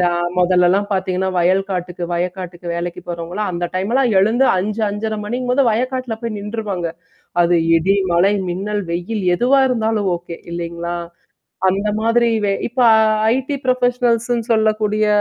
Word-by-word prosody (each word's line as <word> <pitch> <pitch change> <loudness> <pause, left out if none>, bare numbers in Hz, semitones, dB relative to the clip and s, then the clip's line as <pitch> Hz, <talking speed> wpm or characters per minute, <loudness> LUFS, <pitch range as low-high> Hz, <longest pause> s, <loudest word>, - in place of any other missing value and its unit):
இந்த - - +3 0.3
முதல்லலாம் 180 +3 +3
பாத்தீங்கன்னா 190 0 -1
வயல் 185 +3 +2
காட்டுக்கு 180 -1 -3
வயக்காட்டுக்கு 180 0 -4
வேலைக்கு 175 +1 -4
போறவங்களா 175 +4 -4
அந்த 175 0 -2
டைம்லாம் 235 +6 +1
எழுந்து 235 +7 +3
5 210 +4 -2
5:30 215 +1 -3
மணிங்கும்போது 250 +4 0
வயக்காட்டுல 255 +1 -2
போய் 230 -2 -3
நின்றுவாங்க. 205 -4 -4 0.6
அது 175 0 +3 0.2
இடி, 175 +4 +2 0.2
மழை, 185 +4 +4 0.2
மின்னல், 205 +3 -2
வெயில் 180 +6 -3
எதுவா 255 +6 +3
இருந்தாலும் 220 -4 0
ஓகே 170 -1 -9 0.2
இல்லைங்களா? 170 0 -4 0.7
அந்த 195 +3 0
மாதிரி 230 +1 +3 0.4
இப்ப 240 +3 -14 0.6
ஐடி 265 +2 -2
புரொபஷனல்ஸ்ன்னு 245 -2 +1
சொல்லக்கூடிய 215 -1 +1
205 Hz, 125 wpm, -18 LUFS, 180-230 Hz, 0.7 s, மழை